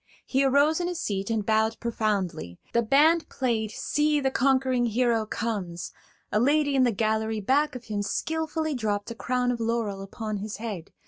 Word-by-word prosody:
He 270 +1 +1
arose 285 +4 +3
in 350 - -1
his 355 -2 -3
seat 195 - -2
and 220 -3 -1
bowed 220 +1 +1
profoundly; 200 - -2 0.2
the 235 - +4
band 305 +8 +4
played 230 -5 -1
"See 295 +6 +1
the 265 -1 0
Conquering 260 -2 +2
Hero 230 -1 +1
Comes"; 195 -8 -3 0.4
a 210 - +2
lady 285 +3 +3
in 270 - +3
the 240 - +3
gallery 220 +1 0
back 285 +7 +1
of 250 - -7
him 210 -2 -2
skilfully 315 +6 -2
dropped 210 -3 -2
a - - -6
crown 250 +1 0
of 240 - -3
laurel 225 -4 -1
upon 215 +2 -5
his 205 +1 -5
head. 210 -7 -6
235 Hz, 180 wpm, -26 LUFS, 215-275 Hz, 0.4 s, the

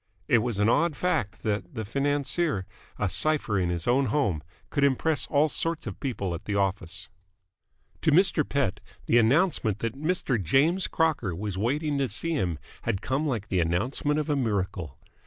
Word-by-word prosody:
It 120 - +5
was 115 -2 -2
an 105 +1 +3
odd 150 +6 +3
fact 115 - -1
that 110 +7 -2
the 110 -2 -3
financier, 140 - 0 0.3
a - - 0
cipher 150 -10 +1
in 90 -1 0
his 85 -1 -2
own 130 +3 +3
home, 105 - +1 0.3
could 140 - +1
impress 140 +2 +2
all 145 +2 +3
sorts 165 +1 -1
of - - -6
people 105 - -2
at 85 - -7
the 105 - -2
office. 90 -3 -1 0.9
To 155 - +3
Mr. 170 -1 +4
Pett, 140 -8 -1 0.3
the 120 - +4
announcement 120 - +2
that 115 +1 -2
Mr. 145 - -1
James 155 - +2
Crocker 145 - 0
was 100 +1 -4
waiting 140 +8 0
to 135 -2 0
see 165 +11 -2
him 90 - -1 0.2
had 95 - -2
come 140 +4 0
like 115 -7 -2
the 95 - +1
announcement 120 - 0
of 150 - -2
a 150 - +1
miracle. 95 - -2
125 Hz, 175 wpm, -27 LUFS, 100-150 Hz, 0.9 s, It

